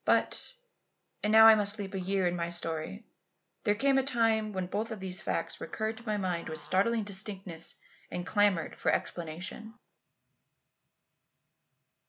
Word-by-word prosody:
But - - +1 0.7
and 210 - +1
now 220 0 +9
I 225 - +11
must 210 0 +2
leap 200 -1 -6
a 195 - -2
year 190 0 0
in 175 0 +1
my 170 -1 -2
story 170 +5 -2 0.6
there 205 - +3
came 270 +4 +3
a - - +1
time 225 -4 +2
when 185 -2 -2
both 210 +5 -3
of 220 -3 -6
these 185 -1 -2
facts - - -3
recurred 220 0 -3
to 225 - -12
my 210 -1 0
mind 180 -4 -2
with 160 - -4
startling 210 +8 +1
distinctness 190 -4 -4 0.3
and 175 - -4
clamoured 205 -5 +1
for - - +1
explanation. 180 +7 -4
200 Hz, 155 wpm, -30 LUFS, 180-220 Hz, 0.7 s, I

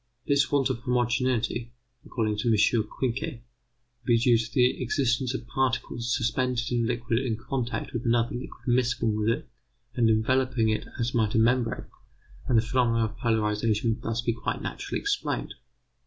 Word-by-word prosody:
This 140 -2 +2
want 140 -2 +2
of 120 - -3
homogeneity 125 0 +1
may, 120 0 -11 0.4
according 110 -3 -1
to 110 - -1
M. 110 - +4 0.3
Quincke, 125 +2 -3 0.6
be 120 -1 +3
due 120 +1 +4
to 115 +1 -1
the 125 +1 +2
existence 125 0 0
of 120 - -5
particles 120 0 -1
suspended 125 -1 0
in 120 -1 +1
a - - 0
liquid 120 -1 0
in 125 -4 -2
contact 125 +2 -3
with 120 -1 -3
another 120 0 +1
liquid 125 - -8
miscible 120 -2 +2
with 105 +1 +1
it 135 +7 -1 0.5
and 115 -2 +3
enveloping 120 +1 +2
it 110 - -1
as 120 0 -1
might 110 -3 +1
a - - +4
membrane, 115 +1 +2 0.6
and 120 - +3
the 110 - +4
phenomena 115 -2 +2
of 110 +1 -7
polarization 110 -1 +1
would 110 - -3
thus 115 +1 -2
be 115 - +1
quite 115 - -3
naturally - - -4
explained. 410 0 -2
120 Hz, 170 wpm, -27 LUFS, 115-125 Hz, 0.6 s, M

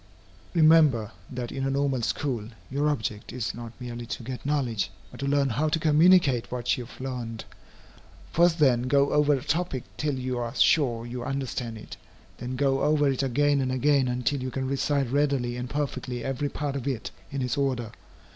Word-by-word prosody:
Remember, 155 -9 +5 0.2
that 125 -2 -5
in 135 - -3
a 135 - +1
Normal 135 -2 0
School 115 -2 -2 0.2
your 145 +2 +1
object 110 -7 -3
is, 120 -2 -3
not 120 -1 -8
merely 120 -1 -6
to 120 - -5
get 125 +1 -6
knowledge, 130 -9 0 0.2
but - - -12
to 140 - -2
learn 140 -1 +2
how 145 +7 0
to 150 - +1
communicate 155 -4 +4
what 125 -1 0
you 120 -2 -6
have - - -14
learned. 120 -4 -5 0.9
First 170 0 +4
then 130 -5 +3
go 140 +1 +3
over 150 0 +4
a 130 - -4
topic 160 -5 -1
till 150 -2 -1
you 130 -1 -2
are 120 +1 -4
sure 120 -8 +3
you 120 0 -5
understand 130 -3 -3
it. 105 - -10 0.4
Then 125 +1 -4
go 135 0 +1
over 145 -1 +3
it 135 - -1
again 140 +2 +2
and 130 -1 -1
again 135 0 +3
until 125 +3 -1
you 130 - -3
can 130 0 -3
recite 140 -1 0
readily 140 -4 +1
and 125 0 -5
perfectly 135 -4 -3
every 135 +2 -2
part 145 -2 -3
of 135 -1 -4
it, 130 -5 -3 0.2
in 135 -1 -3
its 125 - -1
order. 130 -5 -1
135 Hz, 190 wpm, -27 LUFS, 125-145 Hz, 0.9 s, Remember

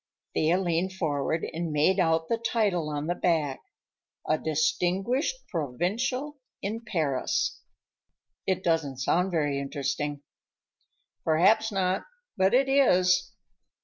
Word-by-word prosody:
Thea 160 +3 +2
leaned 180 0 0
forward 160 -3 -1
and 165 0 -3
made 155 +6 +3
out 165 -2 +2
the 230 - 0
title 205 -9 0
on 145 0 -3
the 175 - 0
back, 160 -7 0 0.7
"A 155 - +2
Distinguished 185 - 0 0.2
Provincial 225 - -2 0.2
in 215 +4 -4
Paris." 155 - -1 0.9
"It 185 -1 0
doesn't 160 -6 0
sound 175 +8 +1
very 145 -5 0
interesting." 140 +1 -3 1.0
"Perhaps 210 +8 +3
not, 190 -1 0 0.3
but 190 +5 +3
it 265 +1 +4
is." 185 -10 +3
175 Hz, 115 wpm, -27 LUFS, 155-195 Hz, 1.0 s, it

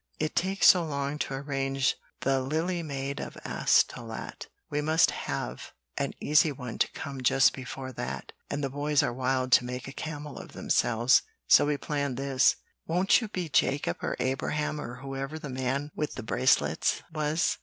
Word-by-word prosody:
It 155 +1 -2
takes 190 +2 +1
so 180 -2 +6
long 140 -1 -3
to 135 - -2
arrange 135 -1 0 0.3
the 135 0 +2
'Lily 160 +6 -1
Maid 140 -3 -4
of - - -6
Astolat' 115 -2 0 0.2
we 145 0 -1
MUST 160 +2 +4
have - - -5 0.2
an - - -2
easy 150 +1 +4
one 125 -4 -7
to - - +2
come 140 -3 -6
just 130 +1 +4
before 130 0 -6
that, 65 - -5 0.2
and 145 0 -3
the 135 - 0
boys 145 +1 +1
are 120 - -1
wild 130 0 0
to 125 - +7
make 125 +1 -5
a - - -6
camel 150 -2 -6
of - - -11
themselves, 120 +1 +3 0.3
so - - +6
we 145 -1 +1
planned 140 -3 -2
this. 135 -1 +3 0.3
Won't 180 +8 +3
you 225 - -3
be 185 -4 -4
Jacob 140 - +1
or - - -2
Abraham 150 +3 -1
or 120 -2 -6
whoever 135 +2 -4
the 150 -2 -7
man 130 +3 -2
with 150 - -3
the 125 - -6
bracelets 125 +3 +2
was?" 155 +1 0
140 Hz, 175 wpm, -28 LUFS, 130-150 Hz, 0.3 s, to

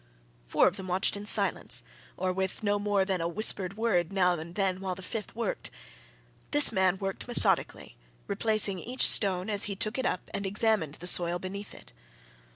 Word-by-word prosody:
Four - - +3
of 185 +2 -2
them 190 -1 -7
watched 185 +3 +1
in 205 +1 -6
silence, 200 -3 +1 0.3
or 185 0 -1
with 190 +3 -3
no 205 0 +1
more 205 -1 +1
than 190 -3 -1
a 165 - -1
whispered 195 +1 +2
word 190 -7 0
now 180 -2 +2
and 170 +1 -7
then 190 -2 0
while 190 -1 -4
the 190 - -10
fifth 215 +2 -6
worked. 230 -3 -4 0.8
This 290 0 +5
man 190 -3 +2
worked 195 +3 -5
methodically, 240 - -2 0.3
replacing 215 - +1
each 250 +7 +4
stone 185 -3 +3
as 205 -2 +3
he 200 - -4
took 215 +6 -1
it 260 - -2
up 180 - -3
and 200 - -3
examined 200 -6 +1
the 175 - -9
soil 175 -1 +2
beneath 200 +3 -8
it. - - -15
195 Hz, 185 wpm, -28 LUFS, 180-210 Hz, 0.8 s, This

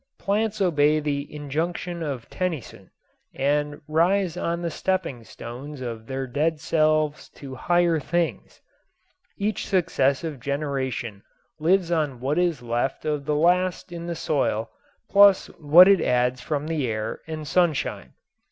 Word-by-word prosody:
Plants 215 +1 -1
obey 155 -4 +3
the 145 -1 -3
injunction 165 +4 -3
of 140 -7 -4
Tennyson 175 -8 -4 0.5
and 145 +1 0
rise 175 +3 +2
on 170 -1 -2
the 170 - -2
stepping 170 -10 -2
stones 130 +6 -9
of 115 -3 -6
their 135 0 -3
dead 150 +5 -1
selves 155 -1 +1
to 135 -2 -9
higher 170 +4 +2
things. 170 +2 -2 0.8
Each 210 -1 -2
successive 155 -5 0
generation 130 -6 -3 0.4
lives 175 +2 +2
on 150 -7 0
what 140 +6 0
is 170 -8 0
left 120 +3 -2
of 150 -2 -1
the 150 - +1
last 180 +3 +1
in 170 0 -6
the 170 - -3
soil 140 -8 -1 0.4
plus 200 -1 +5
what 165 +5 +8
it 200 -2 +5
adds 125 0 +1
from 145 +2 -2
the 155 -5 -1
air 110 0 -3
and 155 -2 -6
sunshine. 170 -4 0
155 Hz, 135 wpm, -24 LUFS, 135-175 Hz, 0.8 s, what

